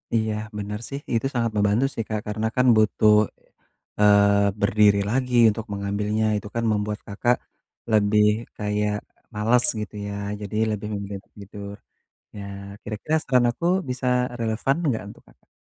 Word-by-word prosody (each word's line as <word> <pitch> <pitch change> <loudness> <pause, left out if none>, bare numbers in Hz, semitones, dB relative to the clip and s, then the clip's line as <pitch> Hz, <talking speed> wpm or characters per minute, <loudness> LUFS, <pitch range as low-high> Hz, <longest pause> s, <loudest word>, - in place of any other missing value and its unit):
Iya, 110 -1 +1 0.2
benar 105 0 -4
sih. 140 - -4
Itu 115 +2 +1
sangat 115 -2 0
membantu 105 +5 +3
sih 115 - -3
Kak. 110 -1 -2
Karena 110 +1 -1
kan 125 - +4
butuh, 110 0 +4 0.9
eee, 100 0 +5
berdiri 100 0 +4
lagi 125 0 0 0.2
untuk 110 +1 -6
mengambilnya. 105 +2 -1
Itu 105 - -6
kan 115 - 0
membuat 105 0 -2
Kakak, 120 +5 +1 0.6
lebih, 105 0 +4 0.3
kayak, 105 0 -1 0.4
males 115 +4 +3 0.2
gitu 105 - -7
ya? 100 - -5 0.3
Jadi 105 0 -6 0.2
lebih 105 0 -4
memilih 100 -1 -6 0.2
tidur. 100 0 -9 0.6
Ya, 100 - -6 0.4
kira-kira 120 +9 -2
saran 125 -3 +3
aku 120 - -7 0.3
bisa 125 0 -3 0.3
relevan 115 +5 0
enggak 125 -8 0
untuk - - -15
Kakak? - - -25
105 Hz, 145 wpm, -24 LUFS, 105-115 Hz, 0.9 s, eee